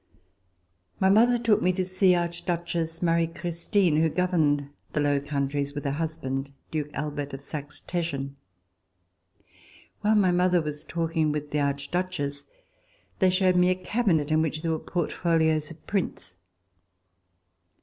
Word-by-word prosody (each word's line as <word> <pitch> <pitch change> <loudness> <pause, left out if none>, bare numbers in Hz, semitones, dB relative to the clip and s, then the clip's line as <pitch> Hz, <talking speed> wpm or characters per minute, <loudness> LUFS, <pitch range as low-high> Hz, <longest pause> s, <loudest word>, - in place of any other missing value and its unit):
My 190 0 +4
mother 240 +4 +5
took 230 -3 +2
me 185 - +3
to 185 0 -1
see 185 0 +3
Archduchess 170 -1 -2
Marie 165 -1 +3
Christine, 170 +1 0
who 160 +1 +3
governed 155 -5 +1 0.2
the - - 0
Low 145 -1 +2
Countries 140 0 -2
with 145 - -5
her 140 - +1
husband, 140 -3 -3 0.2
Duke 150 -2 -2
Albert 145 -1 -3
of 135 - -9
Saxe 145 +1 -7
Teschen. 140 -6 -2 1.7
While 215 +1 +2
my 195 -4 +4
mother 180 0 +3
was 150 -1 -5
talking 165 -2 0
with 150 0 -4
the 150 - 0
Archduchess, 145 +1 -2 0.7
they 190 - +5
showed 185 0 +3
me 180 0 +5
a 185 - +3
cabinet 180 -6 0
in 155 0 +4
which 155 0 -2
there 165 - 0
were 160 - -1
portfolios 160 -3 0
of 165 -1 -13
prints. 170 - -3
165 Hz, 140 wpm, -26 LUFS, 145-180 Hz, 1.7 s, mother